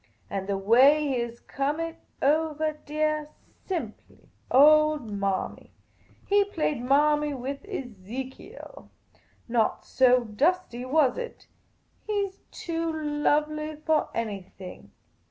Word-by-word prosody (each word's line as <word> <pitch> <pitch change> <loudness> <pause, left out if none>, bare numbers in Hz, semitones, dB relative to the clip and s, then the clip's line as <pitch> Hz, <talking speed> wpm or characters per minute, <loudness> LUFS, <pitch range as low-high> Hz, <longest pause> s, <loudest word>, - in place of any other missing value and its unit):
And 195 -1 -3
the 200 - 0
way 260 +10 +5
he 260 -2 0
has 235 0 -4
come 280 +3 -2
it 330 0 -3 0.3
ovah 310 +1 +1
deah, 305 0 0 0.4
simple, 315 - -6 0.2
old 300 -2 +5
Marmy! 200 -2 -3 0.5
He 405 0 +4
played 310 -9 -2
Marmy 295 +2 +3
with 270 +2 -5
Ezekiel! 255 - -8 0.6
Not 230 -2 0
so 250 -1 +4
dusty, 250 - 0
was 275 - +2
it? 485 - -7 0.6
He 405 -2 0
's 385 - -31
too 330 -1 -3
lovely 305 0 0
for 310 0 0
any 215 -4 -2 0.2
thing 185 -2 -10
295 Hz, 115 wpm, -27 LUFS, 245-310 Hz, 0.6 s, way